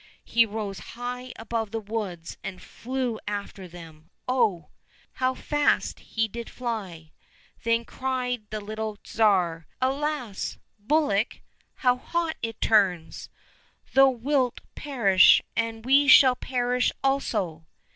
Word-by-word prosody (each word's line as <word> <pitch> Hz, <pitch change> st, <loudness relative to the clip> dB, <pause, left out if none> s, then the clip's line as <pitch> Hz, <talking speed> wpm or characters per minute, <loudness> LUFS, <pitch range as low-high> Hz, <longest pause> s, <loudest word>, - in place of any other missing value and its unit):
He 230 Hz, -1 st, +3 dB
rose 205 Hz, -2 st, -5 dB, 0.2 s
high 250 Hz, +1 st, -5 dB
above 225 Hz, -1 st, -3 dB
the 225 Hz, -, -3 dB
woods 200 Hz, -6 st, -5 dB
and 195 Hz, -2 st, -6 dB
flew 250 Hz, 0 st, -4 dB
after 200 Hz, -2 st, -5 dB
them 165 Hz, -2 st, -13 dB
— -, -, -49 dB
oh! 205 Hz, -11 st, +1 dB, 0.4 s
how 255 Hz, 0 st, 0 dB
fast 295 Hz, +1 st, 0 dB
he 225 Hz, -1 st, -2 dB
did 235 Hz, +2 st, -7 dB
fly! 195 Hz, -10 st, -5 dB, 0.5 s
Then 230 Hz, 0 st, +1 dB
cried 250 Hz, -4 st, -3 dB
the 215 Hz, 0 st, -4 dB
little 215 Hz, 0 st, -5 dB
Tsar, 180 Hz, -7 st, +1 dB
" -, -, -43 dB
Alas! 270 Hz, -5 st, -2 dB, 0.2 s
bullock, 230 Hz, -3 st, +1 dB, 0.4 s
how 250 Hz, 0 st, +5 dB
hot 335 Hz, +4 st, -2 dB
it 225 Hz, -1 st, -4 dB
turns. 190 Hz, -7 st, +1 dB, 0.6 s
Thou 270 Hz, 0 st, +7 dB
wilt 255 Hz, 0 st, 0 dB
perish, 230 Hz, -10 st, +5 dB, 0.2 s
and 225 Hz, 0 st, -2 dB
we 275 Hz, +2 st, +5 dB
shall 260 Hz, -1 st, +8 dB
perish 250 Hz, 0 st, 0 dB
also 205 Hz, -, -1 dB
225 Hz, 125 wpm, -26 LUFS, 200-255 Hz, 0.6 s, shall